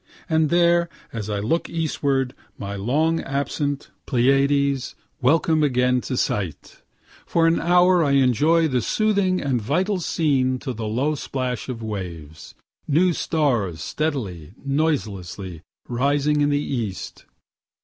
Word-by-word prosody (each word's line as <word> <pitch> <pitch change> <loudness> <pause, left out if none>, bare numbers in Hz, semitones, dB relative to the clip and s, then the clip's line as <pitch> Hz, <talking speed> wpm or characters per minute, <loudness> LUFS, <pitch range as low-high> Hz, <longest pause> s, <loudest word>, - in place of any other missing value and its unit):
And 160 -3 +2
there, 170 0 +3 0.2
as 110 -3 -4
I 105 - -1
look 130 +12 -1
eastward, 140 -5 -1 0.2
my 100 0 -5
long 150 +11 +1
absent 140 +1 -3 0.2
Pleiades, 135 +1 +2 0.3
welcome 155 +4 +3
again 125 -3 +2
to 130 - -4
sight. 95 -9 -3 0.5
For 165 -1 +2
an 165 0 +3
hour 180 +1 +4
I 140 -2 +2
enjoy 145 +5 +3
the 130 -4 0
soothing 200 - +1
and 130 -4 -1
vital 180 - 0
scene 135 -7 +1
to 130 0 -5
the 110 -1 -4
low 130 +8 0
splash 130 -4 -4
of 115 -3 -5
waves 85 -8 -7 0.3
new 170 +5 +3
stars 120 - 0
steadily, 105 - -3
noiselessly 105 - -2 0.3
rising 145 +4 +1
in 145 - +3
the 145 - +2
east. 120 -9 -4
140 Hz, 130 wpm, -23 LUFS, 115-160 Hz, 0.5 s, hour